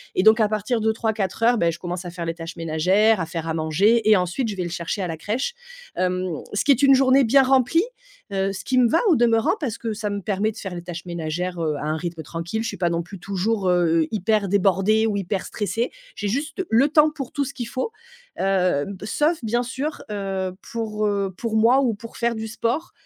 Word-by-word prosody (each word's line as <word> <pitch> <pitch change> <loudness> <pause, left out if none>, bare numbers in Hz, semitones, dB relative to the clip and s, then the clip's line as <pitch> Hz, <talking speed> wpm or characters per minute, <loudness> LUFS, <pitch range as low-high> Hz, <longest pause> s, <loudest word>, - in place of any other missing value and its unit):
et - - +3
donc 220 +1 +6
à 210 - +3
partir 215 +2 -1
de 220 0 +2
3:00-4:00, 220 +1 0
bah, 170 -3 +2
je 170 - -8
commence 180 0 -4
à 175 - -6
faire 170 -1 -6
les 165 - -2
tâches 165 0 -8
ménagères, 180 +6 +2
à - - -1
faire 165 0 -5
à 160 - -1
manger 200 +8 +2
et 210 - +7
ensuite 185 +7 -1
je 200 - -4
vais 180 - -1
le 175 - -4
chercher 170 +3 -3
à 180 - -1
la 165 - -4
crèche. 230 - -2 0.4
Hem, 185 0 0 0.3
ce 205 - 0
qui 285 - +5
est 275 +1 +3
une 275 -1 +7
journée 265 +1 +5
bien 270 +4 +5
remplie, 270 - +3 0.5
heu, 195 0 0
ce 195 - -7
qui 255 - +1
me 245 -2 +5
va 325 - +3
au 335 - +5
demeurant 230 +3 +3
parce 235 -6 -2
que 225 -2 -3
ça 210 -1 -3
me 205 0 -2
permet 205 +3 0
de 220 - -14
faire 190 -3 -6
les 175 - -5
tâches 175 0 -7
ménagères, 175 +1 -3
heu, 155 -2 0
à 150 - -5
un 155 +1 0
rythme 170 0 -5
tranquille, 170 +8 -4
je - - -2
suis 205 - -4
pas 175 -1 +1
non 170 0 0
plus 190 +3 -10
toujours, 195 +1 -1
heu, 165 -2 +3
hyper 210 -1 +1
débordée 200 +3 +3
ou 210 - -1
hyper 195 0 -2
stressée, 225 +4 -2 0.3
j'ai 205 - -2
juste 305 - -2
le 250 +6 +4
temps 305 0 +5
pour 275 -5 -6
tout 285 -2 -1
ce 275 - -6
qu'il 240 -3 -5
faut. 260 - -3 0.4
Hem, 185 -3 +1
b 200 - -9
sauf 305 +8 +1
bien 240 +3 +1
sûr, 270 +5 -4
heu, 195 -2 -2 0.2
pour, 215 -2 -1
heu, 200 -2 -1
pour 230 -2 -3
moi 240 +5 +5
ou 240 -4 +1
pour 230 +3 -10
faire 235 -1 0
du 220 0 -4
sport. 235 +9 -2
210 Hz, 240 wpm, -23 LUFS, 180-235 Hz, 0.5 s, et